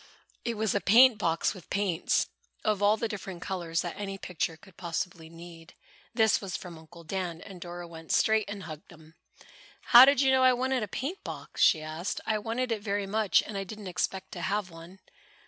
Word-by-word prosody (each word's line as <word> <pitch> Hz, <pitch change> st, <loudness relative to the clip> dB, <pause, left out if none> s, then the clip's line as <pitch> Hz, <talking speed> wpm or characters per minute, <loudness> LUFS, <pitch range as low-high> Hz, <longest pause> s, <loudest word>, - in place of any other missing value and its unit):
It 235 Hz, -1 st, -2 dB
was 220 Hz, -1 st, 0 dB
a 200 Hz, -, 0 dB
paint 235 Hz, +2 st, +6 dB
box 165 Hz, -4 st, +1 dB
with 185 Hz, -5 st, -14 dB
paints 190 Hz, -4 st, +1 dB, 0.4 s
of 210 Hz, -2 st, +1 dB
all 205 Hz, +2 st, +4 dB
the 230 Hz, -, -1 dB
different 190 Hz, -4 st, -7 dB
colors 170 Hz, -3 st, -2 dB
that 175 Hz, -, -5 dB
any 195 Hz, -1 st, -5 dB
picture 170 Hz, -3 st, -3 dB
could 190 Hz, +1 st, -19 dB
possibly 170 Hz, -1 st, -4 dB
need. 165 Hz, 0 st, -13 dB, 0.4 s
This 220 Hz, -2 st, +3 dB
was 190 Hz, -4 st, -4 dB
from 175 Hz, -2 st, -9 dB
Uncle 170 Hz, +1 st, -15 dB
Dan, 175 Hz, -1 st, -4 dB
and 180 Hz, 0 st, -11 dB
Dora 175 Hz, 0 st, -7 dB
went 165 Hz, -1 st, -9 dB
straight 220 Hz, -2 st, +3 dB
and 200 Hz, -1 st, -6 dB
hugged 155 Hz, -1 st, -10 dB
him. 160 Hz, -1 st, -16 dB, 0.8 s
"How 240 Hz, +2 st, +12 dB
did 280 Hz, -1 st, +4 dB
you 265 Hz, -1 st, +4 dB
know 260 Hz, 0 st, +4 dB
I 255 Hz, 0 st, +6 dB
wanted 255 Hz, +1 st, 0 dB
a 215 Hz, -, -2 dB
paint 285 Hz, -, -5 dB
box?" -, -, -7 dB
she 155 Hz, -, +5 dB
asked. 155 Hz, +5 st, -4 dB
"I 215 Hz, -1 st, 0 dB
wanted 230 Hz, +4 st, -2 dB
it 220 Hz, -2 st, -1 dB
very 205 Hz, -1 st, -2 dB
much 210 Hz, 0 st, +2 dB
and 215 Hz, -, -8 dB
I 195 Hz, -, -2 dB
didn't 210 Hz, +2 st, -9 dB
expect 185 Hz, +1 st, -3 dB
to 175 Hz, -, -6 dB
have 195 Hz, 0 st, -1 dB
one." 165 Hz, +3 st, -12 dB
195 Hz, 205 wpm, -29 LUFS, 170-215 Hz, 0.8 s, How